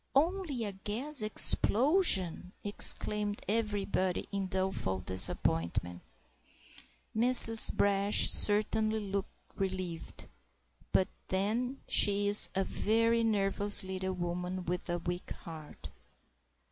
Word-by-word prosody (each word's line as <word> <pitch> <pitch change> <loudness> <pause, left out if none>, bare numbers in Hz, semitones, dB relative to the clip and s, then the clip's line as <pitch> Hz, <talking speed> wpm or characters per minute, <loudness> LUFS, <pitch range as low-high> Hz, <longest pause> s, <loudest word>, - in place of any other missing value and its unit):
] - - -43
"Only 320 -4 -3
a 205 - -6
gas 225 +8 -5
explosion!" 215 - +1
exclaimed 205 0 0
everybody 205 -4 -4
in 200 -1 -5
doleful 185 - -4
disappointment. 90 -1 -3 1.1
Mrs. 230 -1 +9
Brash 200 0 0
certainly 215 +1 +3
looked 200 -1 -7 0.3
relieved; 185 -3 -7 0.7
but 190 - 0 0.2
then 225 +8 -5
she 205 0 +1
is 205 +1 +4
a 195 - -2
very 230 +3 -2
nervous 205 -2 -2
little 190 0 -7
woman 180 +1 -7
with 180 +1 -6
a 175 - -3
weak 175 +1 -8 0.2
heart. 160 -3 -13
200 Hz, 100 wpm, -28 LUFS, 185-220 Hz, 1.1 s, Mrs